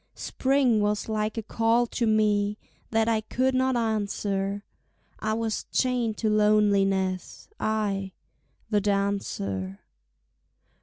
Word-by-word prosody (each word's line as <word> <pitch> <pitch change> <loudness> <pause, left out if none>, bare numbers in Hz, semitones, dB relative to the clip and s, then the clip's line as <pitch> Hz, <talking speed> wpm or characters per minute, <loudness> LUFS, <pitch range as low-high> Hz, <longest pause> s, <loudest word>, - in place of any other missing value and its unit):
Spring 260 -5 +1
was 210 0 0
like 215 0 -2
a 225 - -2
call 230 +2 +2
to 235 0 -2
me 210 -1 +2 0.3
That 225 0 +1
I 225 -1 +2
could 255 +4 0
not 260 0 +2
answer, 205 -3 -1 0.6
I 215 0 -1
was 225 -1 -2
chained 245 -4 0
to 220 - -1
loneliness, 200 -3 +2
I, 200 -3 -1 0.6
the 205 -1 +3
dancer. 195 - -2
215 Hz, 110 wpm, -26 LUFS, 200-225 Hz, 0.6 s, the